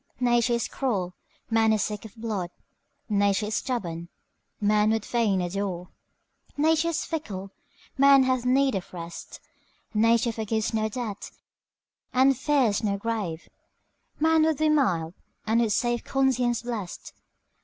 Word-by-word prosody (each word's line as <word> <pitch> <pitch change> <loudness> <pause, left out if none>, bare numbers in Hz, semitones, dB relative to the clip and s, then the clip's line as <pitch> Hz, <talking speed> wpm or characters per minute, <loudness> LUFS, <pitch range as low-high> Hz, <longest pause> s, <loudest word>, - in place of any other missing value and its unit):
Nature 240 -1 +2
is 235 - 0
cruel, 195 -10 -2 0.4
man 225 0 +4
is 215 -1 +2
sick 210 0 -4
of 220 - -12
blood; 215 -6 -3 0.6
Nature 205 0 +2
is 210 - -4
stubborn, 170 -9 -3 0.5
man 210 0 +3
would 220 -1 0
fain 215 -6 +1
adore; 180 -1 -3 0.7
Nature 320 +2 +3
is 325 -1 -1
fickle, 200 - -5 0.5
man 275 -1 +7
hath 255 -1 +1
need 265 +1 +3
of 190 -2 -4
rest; 170 0 -8 0.5
Nature 230 +2 +3
forgives 220 0 -2
no 220 0 0
debt, 220 -3 -5 0.8
and 265 +2 +4
fears 260 -6 +1
no 200 -2 0
grave; 200 -7 -3 0.7
Man 320 +1 +4
would 315 -2 +2
be 310 0 +2
mild, 180 - +1 0.3
and 225 +2 +2
with 225 -2 +1
safe 240 +3 0
conscience 250 -3 +1
blest. 225 -7 -6
225 Hz, 135 wpm, -26 LUFS, 200-255 Hz, 0.8 s, man